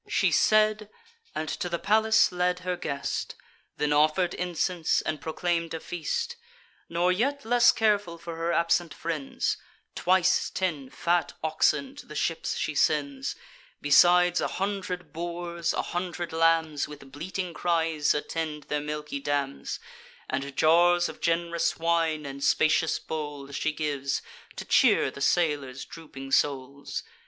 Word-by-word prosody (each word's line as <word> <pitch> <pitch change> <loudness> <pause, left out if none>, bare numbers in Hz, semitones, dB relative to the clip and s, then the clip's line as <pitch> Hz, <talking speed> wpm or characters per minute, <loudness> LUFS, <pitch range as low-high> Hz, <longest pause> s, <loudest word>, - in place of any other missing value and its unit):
She - - +2
said, 215 -1 +3 0.5
and 155 - -2
to 180 - -3
the 170 - -1
palace 220 +3 +4
led 180 0 0
her 180 0 -2
guest; 140 -5 -3 0.4
Then 150 0 +1
offer'd 155 +4 +3
incense, 175 -1 0
and 155 -1 -3
proclaim'd 165 0 -1
a - - -4
feast. 175 - -3 0.5
Nor 175 +2 +2
yet 275 +9 0
less 240 +1 +6
careful 205 -6 +1
for 170 0 -7
her 165 +1 -1
absent 170 0 +1
friends, 160 -5 -2 0.4
Twice 185 0 +2
ten 155 -8 -2
fat 170 +1 0
oxen 265 - +1
to - - -11
the - - -10
ships - - -1
she - - -2
sends; 275 -1 0 0.4
Besides 175 +4 +5
a - - +1
hundred 195 -2 -4
boars, 170 0 -3
a - - -1
hundred 175 -1 -4
lambs, 165 -2 +2
With 145 -2 -12
bleating 180 +4 -4
cries, 165 -3 +1
attend 150 0 -3
their 150 +1 -2
milky 150 -1 -4
dams; 140 -1 -2 0.5
And 135 +1 -4
jars 175 +2 +4
of - - -10
gen'rous 170 0 0
wine 165 -2 +1
and 140 0 -6
spacious 155 +4 +3
bowls 145 -3 -6
She 155 - 0
gives, 145 -3 -2 0.3
to - - -6
cheer - - +4
the 140 - -10
sailors' 145 -5 +1
drooping 135 -5 -10
souls. 140 0 0
165 Hz, 140 wpm, -27 LUFS, 150-180 Hz, 0.5 s, less